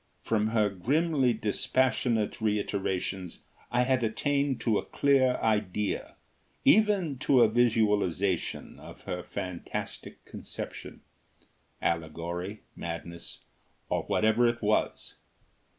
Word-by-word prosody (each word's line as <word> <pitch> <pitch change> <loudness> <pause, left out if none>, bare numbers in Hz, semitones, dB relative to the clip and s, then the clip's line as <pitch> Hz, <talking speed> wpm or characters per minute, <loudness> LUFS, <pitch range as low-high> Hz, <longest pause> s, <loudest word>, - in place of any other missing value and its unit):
From 110 -1 +1
her 110 -2 +2
grimly 135 - +1
dispassionate 115 0 0
reiterations 95 -3 -2 0.3
I 125 +1 +2
had 130 -1 +1
attained 140 +4 0
to 110 -4 +2
a - - -7
clear 135 -3 +3
idea, 105 -2 -1 0.5
even 200 -10 +4
to 130 -2 +4
a 115 - +7
visualisation, 105 -6 +1
of - - -12
her - - -4
fantastic 90 -2 -6
conception - - -8 0.8
allegory, 85 +5 -3
madness, 85 0 -7 0.5
or - - +1
whatever 110 +3 +3
it 120 -1 -4
was. 105 +1 0
110 Hz, 100 wpm, -29 LUFS, 95-125 Hz, 0.8 s, a